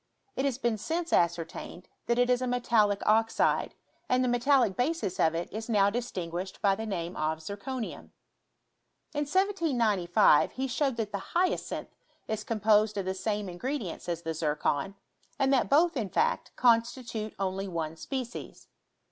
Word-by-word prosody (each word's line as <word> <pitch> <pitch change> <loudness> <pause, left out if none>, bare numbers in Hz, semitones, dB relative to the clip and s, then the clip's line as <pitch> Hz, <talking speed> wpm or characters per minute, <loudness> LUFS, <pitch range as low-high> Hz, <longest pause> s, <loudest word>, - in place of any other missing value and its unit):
It 265 - 0
has 270 -4 0
been 235 -4 0
since 330 +9 -2
ascertained, 170 +1 -1 0.2
that 235 - +2
it 245 0 +4
is 250 0 +2
a 255 - -1
metallic 230 -5 +2
oxide, 225 +1 +2 0.3
and 255 0 +3
the - - +1
metallic 245 -3 +3
basis 250 - -1
of 160 0 +3
it 170 - -2
is 220 +2 -5
now 200 -3 +4
distinguished 190 -6 -4
by 200 -1 +3
the 220 +3 -4
name 175 -3 -3
of 155 +1 -1
zirconium. 205 +8 -6 1.0
In 295 0 -1
1795 245 - +3
he 265 - -2
showed 265 0 0
that 215 -2 -2
the 200 - -2 0.2
hyacinth 365 +1 0 0.4
is 215 -1 -3
composed 215 -1 +2
of 195 - -1
the 190 - -1
same 205 +1 -2
ingredients 185 - -4
as 170 -1 -3
the 160 - -2
zircon; 150 +3 -1 0.4
and 275 -1 +2
that 260 - +2
both, 330 +4 +4
in 220 -7 -2
fact, 465 - 0
constitute 230 -2 +1
only 195 0 -2
one 165 -3 -3
species. 250 - -6
220 Hz, 155 wpm, -29 LUFS, 185-255 Hz, 1.0 s, it